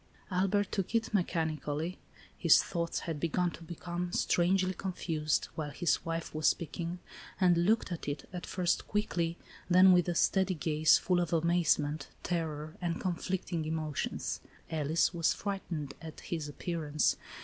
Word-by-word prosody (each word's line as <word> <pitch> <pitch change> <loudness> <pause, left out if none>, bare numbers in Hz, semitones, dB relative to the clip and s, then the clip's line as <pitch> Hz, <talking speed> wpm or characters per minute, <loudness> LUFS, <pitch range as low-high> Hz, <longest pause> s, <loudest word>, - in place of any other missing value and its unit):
Albert 195 +2 +1
took 195 +2 -2
it 225 -1 0
mechanically, 160 -2 -1 0.4
(his - - +6
thoughts 170 -2 -2
had 160 -3 -4
begun 175 +3 +1
to - - -11
become 175 +1 -4
strangely 185 +2 +2
confused, 165 -5 -1
while 155 -2 -3
his 170 +3 0
wife 165 0 -3
was 155 0 +1
speaking) 170 +1 -1 0.4
and 175 -2 +4
looked 220 -2 +2
at 170 - -5
it, 145 0 -4
at 180 - -5
first 180 -2 0
quickly, 175 -5 -1 0.3
then 185 +1 +8
with 180 -1 +4
a 175 - -1
steady 190 +1 +2
gaze, 155 0 +4
full 180 -1 +1
of 175 -2 -1
amaze 170 0 +3
ment, 145 0 -3 0.2
terror 155 -3 -2
and 170 -1 -1
conflicting 180 -1 -2
emotions. 155 -2 -2 0.3
Alice 160 +2 +1
was 170 -2 +2
frightened 170 -8 -4
at 160 -2 -9
his 160 -4 -4
appearance. 155 -1 0
170 Hz, 150 wpm, -32 LUFS, 155-180 Hz, 0.4 s, then